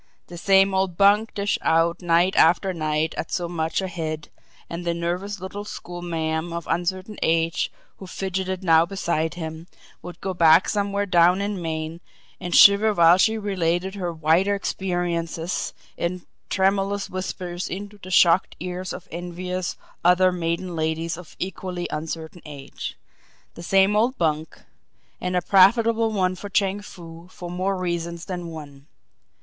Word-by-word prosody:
The 175 - -8
same 195 +1 +4
old 190 -2 0
bunk 205 +3 +4
dished 205 -1 0
out 165 +2 +2
night 175 +2 +2
after 180 +3 +4
night 155 -1 -1
at - - -4
so 175 -2 -1
much 160 0 -1
a 190 - -2
head 155 -4 -5 0.4
and 170 +1 -6
the 170 -1 -1
nervous 180 +4 -3
little 190 +3 -6
schoolma'am 170 -4 -4
of 170 0 -5
uncertain 185 +4 -2
age, 165 +1 +1 0.3
who 190 - -10
fidgeted 190 0 -3
now 165 -2 +5
beside 170 -3 -2
him, 160 0 -7 0.3
would 180 0 -9
go 190 - -3
back 165 0 +5
somewhere 200 -1 0
down 180 -1 +4
in 200 -2 -2
Maine 160 0 -4 0.4
and 175 - -2
shiver 205 +1 +7
while 170 +1 +6
she 220 +3 +3
related 190 -3 -1
her 180 -4 -3
"wider 165 +5 +2
experiences" 175 -3 -2 0.3
in 175 +1 -3 0.2
tremulous 195 +1 +1
whispers 180 -1 -5
into 205 +2 -7
the 185 - -10
shocked 180 0 +4
ears 180 +1 -5
of 180 - -9
envious 180 +1 -4 0.3
other 180 +1 +5
maiden 175 0 -2
ladies 160 +1 -1
of 175 -1 -12
equally 180 -1 -4
uncertain 160 +2 -5
age. 140 -2 -8 0.6
The - - -10
same 195 +3 +3
old 235 +5 +2
bunk 160 -1 -1 0.6
and 180 0 -2
a 180 - +1
profitable 225 +4 +4
one 185 -3 +1
for 200 +2 -8
Chang 195 0 +1
Foo 170 -3 -12
for 175 -1 -8
more 185 +2 -1
reasons 170 -2 -3
than 175 -2 -5
one. 145 -3 -10
180 Hz, 150 wpm, -23 LUFS, 165-190 Hz, 0.6 s, shiver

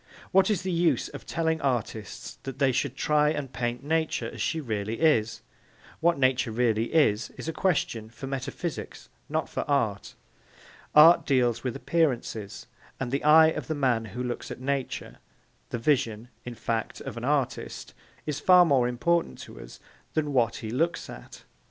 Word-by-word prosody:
What 195 +3 +4
is 195 -4 0
the 185 - -2
use 165 -6 +1
of - - -10
telling 160 -1 -1
artists 120 -5 -3
that 135 -1 -7
they 135 -2 +3
should 130 +1 -1
try 150 +2 +2
and 145 -4 -3
paint 120 +1 -3
Nature 160 +2 0
as - - -7
she 165 - 0
really 110 -5 -3
is? 115 -9 +2 0.6
What 170 +1 +2
Nature 130 -2 +2
really 115 -1 +1
is, 130 -9 +2
is - - -7
a 165 - -2
question 140 - -1
for 115 +4 -9
metaphysics 135 +5 -5 0.2
not - - -1
for - - -3
art. - - 0 0.8
Art 160 +3 +8
deals 120 -4 +2
with 125 -3 -2
appearances, 120 -10 -1 0.3
and 125 -2 -3
the 140 - -1
eye 160 +1 +7
of - - -4
the 155 - -2
man 125 -5 +1
who 115 +4 -5
looks 120 -1 -4
at - - -7
Nature, 135 0 -3 0.5
the - - -3
vision, 120 -3 0 0.2
in 120 -1 -6
fact, 115 0 -3
of - - -6
the 115 - -7
artist, 140 -1 -2 0.3
is 150 -2 -3
far 180 -1 +6
more 135 -6 +3
important 170 +8 0
to - - -11
us - - -12 0.4
than 150 -2 0
what 115 -3 +2
he 110 -2 -6
looks 165 +8 -1
at. - - -12
135 Hz, 170 wpm, -27 LUFS, 120-160 Hz, 0.8 s, Art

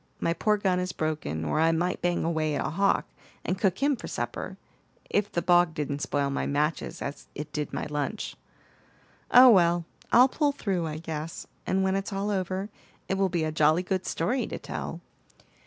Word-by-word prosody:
My 165 - +1
poor 210 +4 +2
gun 190 -3 +1
is 180 0 -2
broken, 155 - -2
or 75 - 0
I 165 +1 +4
might 175 +3 -1
bang 175 0 +1
away 160 -2 0
at - - -1
a - - -2
hawk, 195 +4 +2 0.4
and 185 +1 -1
cook 190 +5 +1
him 285 0 +3
for - - -8
supper, - - -4 0.5
if 205 0 +1
the 170 - -1
bog 175 -2 +4
didn't 145 -1 -3
spoil 140 -1 0
my 140 - -1
matches 150 +2 -1
as 140 0 -6
it 150 - -6
did 150 -1 -3
my - - -3
lunch. 150 +8 -3 0.9
Oh, 250 0 +9
well! 175 -4 +4 0.3
I'll 250 +2 +8
pull 290 +1 +1
through, 185 -10 -1
I 155 0 -4
guess, 160 0 -5 0.2
and 190 +1 +2
when 190 0 +1
it's 195 +1 -2
all 200 +1 -1
over, 190 +1 -2 0.4
it - - 0
will 195 0 +1
be 170 -2 0
a 155 - -1
jolly 155 +3 +3
good 185 0 -2
story 245 +11 0
to - - -5
tell." - - -6
175 Hz, 195 wpm, -27 LUFS, 155-195 Hz, 0.9 s, Oh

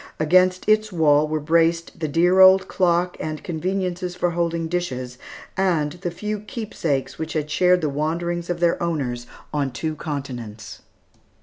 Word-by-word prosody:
Against 185 +3 +3
its 215 0 +3
wall 155 -3 +3
were 155 0 -1
braced 165 +2 +1
the 155 - -1
dear 175 +5 +3
old 190 0 +7
clock 175 -1 +1
and 155 -1 -5
conveniences 180 +1 -3
for 175 -1 0
holding 170 -1 -1
dishes, 130 -8 -4 0.4
and 170 -6 +1
the 175 +3 -5
few 210 +5 -4
keepsakes 200 - -3
which 160 0 -4
had 150 -1 -2
shared 180 +2 +3
the 155 - 0
wanderings 170 +4 -2
of 175 -1 -2
their 170 -1 +2
owners 130 -8 -2 0.3
on 145 -2 0
two 155 +5 -3
continents. 120 - -6
170 Hz, 150 wpm, -22 LUFS, 150-180 Hz, 0.4 s, old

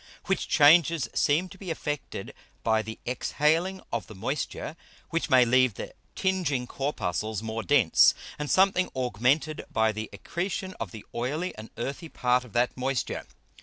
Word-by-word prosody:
Which 195 - 0
Changes 155 -2 +5
seem 160 +6 +2
to 195 - -13
be 190 - -7
effected 150 -3 -4 0.3
by 110 -1 +3
the 110 +1 -7
exhaling 160 +9 0
of 115 - -2
the 110 - -11
Moisture 135 +8 -3 0.4
which 165 0 -1
may 130 -2 +6
leave 130 -2 +4
the - - -7 0.2
tinging 175 -10 0
Corpuscles 110 -6 -2
more 110 0 -3
dense, 125 - +5 0.2
and 150 -1 -3
something 190 -1 +4
augmented 130 +5 +1
by 110 0 +3
the 110 0 -5
Accretion 185 - -4
of - - -3
the 110 -2 -10
oily 150 +10 -2
and 110 +1 -9
earthy 140 +8 -4
Part 125 -2 +1
of 125 - -15
that 120 +1 +2
Moisture. 130 -1 -2
135 Hz, 155 wpm, -27 LUFS, 115-165 Hz, 0.4 s, may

